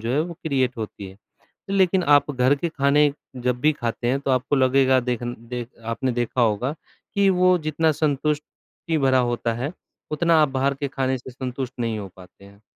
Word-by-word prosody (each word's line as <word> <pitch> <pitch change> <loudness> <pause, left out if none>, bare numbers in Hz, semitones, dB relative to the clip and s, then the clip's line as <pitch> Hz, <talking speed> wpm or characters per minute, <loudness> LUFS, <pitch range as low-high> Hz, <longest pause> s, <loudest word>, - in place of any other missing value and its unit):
जो 115 +3 -2
है 145 - +2
वो 170 +1 -4
क्रिएट 130 -5 0
होती 105 -3 -6
है। 95 - -14 0.5
लेकिन 190 -2 +3
आप 145 0 +4
घर 130 +2 +3
के 170 +4 -2
खाने 145 -1 +3 0.2
जब 125 0 -1
भी 155 +1 +4
खाते 120 -2 -3
हैं 130 +3 +1
तो 140 -1 -1
आपको 130 +3 +1
लगेगा 130 0 +4
देख 125 -1 -2
देख 120 0 -5 0.3
आपने 130 +1 -1
देखा 120 +1 -1
होगा, 115 +5 +1 0.4
कि 200 -1 +4
वो 185 0 +4
जितना 160 +1 +2
संतुष्टि 150 +2 -2
भरा 130 -2 +3
होता 115 -1 -1
है, 130 +7 -3 0.4
उतना 160 +1 +3
आप 150 - +3
बाहर 135 +1 0
के 140 +1 -4
खाने 130 -1 -1
से 130 +1 -11
संतुष्ट 125 0 -5
नहीं 115 -2 -1
हो 100 - -6
पाते 95 +1 -16
हैं। 100 +1 -18
130 Hz, 195 wpm, -23 LUFS, 120-150 Hz, 0.5 s, आप